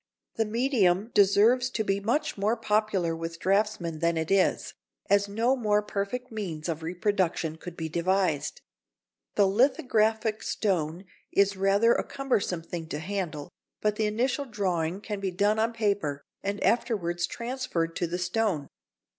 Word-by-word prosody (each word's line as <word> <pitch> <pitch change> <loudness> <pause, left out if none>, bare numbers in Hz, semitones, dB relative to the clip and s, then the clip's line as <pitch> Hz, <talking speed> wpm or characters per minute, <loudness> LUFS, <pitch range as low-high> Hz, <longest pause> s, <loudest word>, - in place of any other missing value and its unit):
The 225 - 0
medium 220 -3 +2
deserves 220 +5 +4
to 235 -3 -1
be 195 -1 0
much 245 +10 0
more 210 +4 0
popular 210 -6 +1
with 165 0 -5
draughtsmen 190 -4 0
than 170 0 +1
it 160 +2 -2
is, 195 -1 +2 0.4
as 200 0 +4
no 230 +6 +1
more 210 -4 +1
perfect 210 +5 -3
means 180 -8 -4
of 165 -1 -3
reproduction 175 -2 -1
could 170 +1 -9
be 160 - -3
devised. 170 -1 0 0.7
The 205 - +5
lithographic 220 -2 +2
stone 175 -3 -1 0.3
is 200 0 +3
rather 200 +4 +4
a - - 0
cumbersome 205 -11 -1
thing 165 -1 -6
to 150 - -4
handle, 170 -3 -4 0.3
but 210 -1 +1
the 215 - +1
initial 250 +6 0
drawing 185 -6 -1
can 210 -2 -4
be 195 -1 -1
done 205 +4 +1
on 225 +1 +2
paper 200 -11 -1 0.2
and 200 +1 -3
afterwards 175 -8 +1
transferred 235 -10 -3
to 175 - 0
the 175 +2 -3
stone. 180 -4 -1
200 Hz, 150 wpm, -28 LUFS, 175-220 Hz, 0.7 s, The